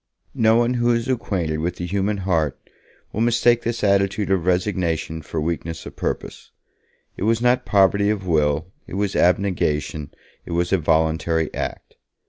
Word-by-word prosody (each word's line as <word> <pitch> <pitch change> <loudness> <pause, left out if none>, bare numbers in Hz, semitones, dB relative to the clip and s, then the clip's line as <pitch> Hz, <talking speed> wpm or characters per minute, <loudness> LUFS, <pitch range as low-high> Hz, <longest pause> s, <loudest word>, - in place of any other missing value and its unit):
No 110 0 +3
one 120 +1 +2
who 120 -1 +1
is 115 0 -2
acquainted 95 -11 -1
with 85 +2 -2
the 90 - -5
human 100 +3 -1
heart 80 -7 0 0.5
will 110 - -2
mistake 120 0 +3
this 115 -1 -3
attitude 100 0 +2
of 90 -2 +1
resignation 90 -4 0
for 80 +1 -4
weakness 80 +1 -3
of - - -9
purpose. - - -4 0.7
It - - -9
was 115 +1 +2
not 125 +1 +2
poverty 100 +1 +3
of 105 -3 -1
will, 80 0 +1 0.2
it - - -7
was 100 -1 -1
abnegation, 80 -6 +1 0.3
it - - -7
was 85 +2 0
a 95 - +3
voluntary 80 0 +1
act. - - -5
95 Hz, 160 wpm, -22 LUFS, 80-105 Hz, 0.7 s, No